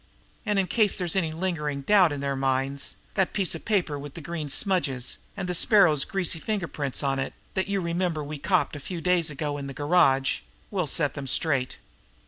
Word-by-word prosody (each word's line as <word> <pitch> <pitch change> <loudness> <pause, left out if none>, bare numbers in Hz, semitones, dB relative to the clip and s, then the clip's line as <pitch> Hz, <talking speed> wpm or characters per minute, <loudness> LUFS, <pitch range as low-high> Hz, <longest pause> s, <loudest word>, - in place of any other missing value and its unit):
And 210 -1 +1
in 195 - +3
case 210 +1 +2
there's 180 -2 -1
any 170 -5 +1
lingering 155 -4 -2
doubt 185 +1 +5
in 145 -1 -4
their 140 0 -1
minds, 135 +1 0 0.2
that 190 -2 +1
piece 195 -4 +1
of 165 - -8
paper 180 -9 0
with 145 0 -9
the - - -6
grease 155 -2 -4
smudges 140 - +1 0.2
and 180 - -3
the 180 - -1
Sparrow's 175 - +4
greasy 180 -4 -1
finger 200 0 -2
prints 145 -3 -2
on 135 -1 0
it, 135 - -3 0.2
that 190 -1 0
you 200 -1 0
remember 170 -2 -1
we 145 0 -6
copped 185 -1 +1
a - - -6
few 175 +5 -5
days 175 -1 +2
ago 145 0 -3
in 140 - -5
the 135 - -7
garage, 145 -4 +3 0.3
will 185 -6 -1
set 145 0 +2
them 140 -2 -6
straight. 135 -2 0
160 Hz, 205 wpm, -26 LUFS, 140-185 Hz, 0.3 s, doubt